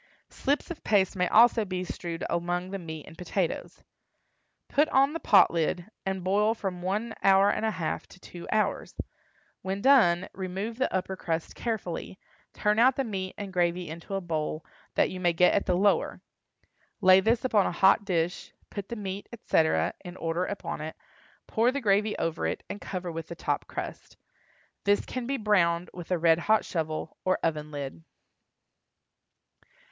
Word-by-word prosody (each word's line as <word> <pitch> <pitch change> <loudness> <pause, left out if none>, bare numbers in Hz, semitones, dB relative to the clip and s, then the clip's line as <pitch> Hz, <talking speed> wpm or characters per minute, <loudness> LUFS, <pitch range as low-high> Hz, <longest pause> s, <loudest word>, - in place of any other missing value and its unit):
Slips 285 +5 -1
of 340 - -8
paste 200 -2 +2
may 180 -1 +1
also 230 +2 +6
be 185 -2 -3
strewed 170 -1 -5
among 175 +2 -2
the 195 - -3
meat 160 -3 -7
and 160 - -13
potatoes. 180 +1 -3 0.8
Put 295 +2 +2
on 275 +2 +4
the 330 - -3
pot 195 - +6
lid, 170 +4 -1 0.2
and 190 -1 -2
boil 210 +4 +2
from 190 -5 -4
one 210 +5 -2
hour 195 +1 +5
and - - -2
a - - +2
half 185 -7 -3
to - - -16
two 175 -1 -10
hours. 215 0 0 0.7
When 190 +1 -3
done, 200 -9 +5
remove 195 +5 -4
the 260 - +1
upper 190 0 -2
crust 165 -3 -3
carefully, 195 -6 -4 0.3
turn 210 +1 +1
out 255 +2 +6
the 270 - 0
meat 190 -5 -4
and 200 -2 -6
gravy 175 0 +1
into 170 +4 -6
a 195 - -1
bowl, 155 -2 -3 0.3
that - - +3
you 185 - -6
may 175 -2 +2
get 180 +2 +4
at 200 - +1
the 180 -1 +2
lower. 200 +2 +2 0.8
Lay 185 -2 +7
this 230 +5 +1
upon 215 -6 +3
a - - -1
hot 190 +3 +4
dish, 175 -2 -1 0.2
put 200 -2 -6
the 235 - -4
meat, 200 -2 -5
etc., 165 -8 +1
in 180 -1 -8
order 165 +2 -1
upon 200 -5 -5
it, 155 +1 -6 0.5
pour 230 +3 +2
the 280 - -2
gravy 210 -2 +2
over 165 0 -1
it, - - -3
and 205 - -7
cover 180 -2 -4
with 165 -1 -6
the 170 - -7
top - - -2
crust. - - -7 0.7
This 205 0 +2
can 255 -2 -4
be 275 +1 -1
browned 180 -6 +2
with 175 -2 -9
a 180 - +2
red 165 0 +4
hot 215 +4 +2
shovel, 155 -2 -3
or 185 - +2
oven 150 -2 -1
lid. 145 +1 -6
185 Hz, 175 wpm, -28 LUFS, 170-210 Hz, 0.8 s, Lay